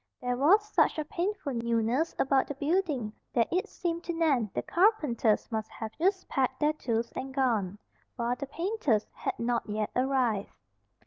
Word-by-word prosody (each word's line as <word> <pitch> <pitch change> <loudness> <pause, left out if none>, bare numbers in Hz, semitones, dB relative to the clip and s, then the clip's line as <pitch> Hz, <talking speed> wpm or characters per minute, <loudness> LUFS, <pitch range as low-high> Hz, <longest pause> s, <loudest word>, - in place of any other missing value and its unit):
There 250 0 -1
was 375 +11 +4
such 420 - +2
a 310 - -2
painful 350 -3 -2
newness 235 +6 0
about 270 0 +2
the 285 - -5
building 290 - 0 0.2
that 230 - +3
it 370 +2 0
seemed 340 -1 -3
to 345 - -2
Nan 290 -10 +2
the - - -1
carpenters 300 - +2
must 220 -1 -2
have 220 -1 -6
just 375 +2 +1
packed 260 -1 0
their 300 0 +3
tools 235 -5 -2
and 265 +1 -5
gone, 225 -8 0 0.4
while 240 0 0
the 280 - -6
painters 320 - 0
had - - -3
not 235 -1 -1
yet 210 0 -2
arrived. 250 -6 0
265 Hz, 170 wpm, -29 LUFS, 230-330 Hz, 0.4 s, was